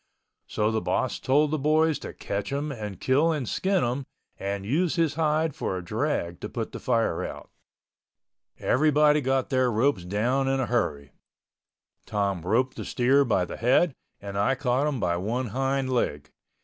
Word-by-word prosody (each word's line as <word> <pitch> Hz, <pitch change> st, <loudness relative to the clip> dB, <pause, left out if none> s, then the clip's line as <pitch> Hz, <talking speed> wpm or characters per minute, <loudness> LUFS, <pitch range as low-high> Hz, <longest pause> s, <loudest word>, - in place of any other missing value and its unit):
So 105 Hz, +1 st, 0 dB
the 110 Hz, 0 st, 0 dB
boss 90 Hz, +8 st, -1 dB
told 145 Hz, +3 st, +2 dB
the 155 Hz, -, 0 dB
boys 155 Hz, +2 st, +2 dB
to -, -, -7 dB
catch 100 Hz, +3 st, -4 dB
him 145 Hz, +2 st, -2 dB
and 105 Hz, -7 st, -6 dB
kill 145 Hz, +6 st, +3 dB
and 145 Hz, -7 st, -2 dB
skin 190 Hz, -1 st, +1 dB
him 125 Hz, +3 st, -2 dB, 0.3 s
and 100 Hz, 0 st, -3 dB
use 160 Hz, -, +1 dB
his 165 Hz, -4 st, +1 dB
hide 155 Hz, 0 st, +1 dB
for 130 Hz, -10 st, -3 dB
a 90 Hz, -, -7 dB
drag 85 Hz, 0 st, -2 dB
to -, -, -6 dB
put -, -, -4 dB
the -, -, -7 dB
fire 115 Hz, -2 st, 0 dB
out. -, -, -7 dB, 1.1 s
Everybody 150 Hz, +2 st, +3 dB
got 135 Hz, 0 st, 0 dB
their 130 Hz, -2 st, +2 dB
ropes 115 Hz, -3 st, +1 dB
down 120 Hz, +9 st, 0 dB
in 135 Hz, 0 st, +1 dB
a 130 Hz, -, +1 dB
hurry. 75 Hz, -, -1 dB, 1.0 s
Tom 100 Hz, -4 st, -1 dB
roped 125 Hz, +9 st, 0 dB
the -, -, -4 dB
steer 135 Hz, +3 st, +3 dB
by 100 Hz, -8 st, +1 dB
the -, -, -7 dB
head 130 Hz, +7 st, +3 dB, 0.3 s
and 100 Hz, 0 st, -5 dB
I 130 Hz, +7 st, +2 dB
caught 130 Hz, +2 st, +1 dB
him 140 Hz, -4 st, -2 dB
by 85 Hz, -3 st, 0 dB
one 115 Hz, +7 st, -2 dB
hind 135 Hz, +2 st, -1 dB
leg. 75 Hz, -, -1 dB
130 Hz, 175 wpm, -26 LUFS, 105-145 Hz, 1.1 s, kill